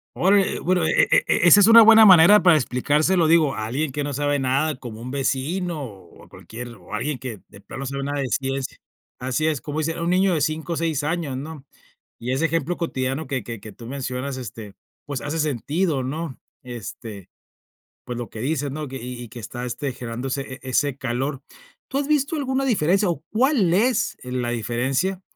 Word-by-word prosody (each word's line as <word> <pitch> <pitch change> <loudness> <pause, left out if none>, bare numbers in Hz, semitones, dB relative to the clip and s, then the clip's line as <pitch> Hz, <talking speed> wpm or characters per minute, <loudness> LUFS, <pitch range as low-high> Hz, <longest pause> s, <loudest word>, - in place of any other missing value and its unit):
Órale, 195 +2 +2
bueno, 180 -1 +1
e - - +3
e - - +6
e 175 - +3
esa 205 - +9
es 205 - +6
una 230 0 +10
buena 225 0 +8
manera 185 +2 +8
para 175 -3 +6
explicárselo, 150 +6 +1
digo, 160 -4 +4
a 110 - -3
alguien 145 +5 -2
que 145 +2 -3
no 145 0 -3
sabe 145 +1 0
nada, 135 +4 0
como 120 -3 -9
un 125 +2 -6
vecino, 150 +5 -2
o 95 -8 -12
o, - - -17
cualquier 120 +2 -9
o 100 -4 -13
alguien 130 +5 -2
que 120 -6 -7
de 100 - -15
plano 135 +6 -7
sabe 140 +1 -4
nada 145 0 -2
de 135 - -1
ciencia. 135 0 -2 0.4
Así 130 +4 -1
es, 155 -4 -1
como 150 +1 -4
dicen, 165 +1 -2
a - - -5
un 170 - 0
niño 185 +1 +3
de 155 - 0
5, 155 +3 -1
6 160 -3 -1
años, 150 -4 -2
¿no? 145 0 -8 0.5
Y 120 +2 -4
ese 135 +5 +1
ejemplo 165 +1 -1
cotidiano 135 -2 -2
que 130 -5 -3
que 115 0 -7
que 110 - -10
tú 115 - -13
mencionas, 130 0 -4
este, 110 -5 -8 0.3
pues, 140 -3 -4
hace 150 +2 -3
sentido, 150 - -1
¿no? 150 +2 -5 0.2
Este, 115 -4 -8 0.8
pues, 125 -1 -5
lo 120 -1 -5
que 110 - -9
dices, 145 +1 -1
¿no? 150 +1 -5
Que 135 - -8
y 125 0 -7
y 120 - -11
que 120 - -10
está, 120 +3 -6
este, 135 +3 -3
generándose 125 +2 -4
e 135 -1 -8
e 130 - -7
ese 140 +1 +1
calor. 135 +2 -3 0.5
¿Tú 270 - -2
has 280 0 -1
visto 300 +1 +1
alguna 270 -1 -1
diferencia, 195 - +2
o, 160 -3 -3
cuál 230 - +2
es 235 +7 +2
el 125 0 -3
la 120 - -2
diferencia 130 - -1
140 Hz, 210 wpm, -23 LUFS, 125-165 Hz, 0.8 s, una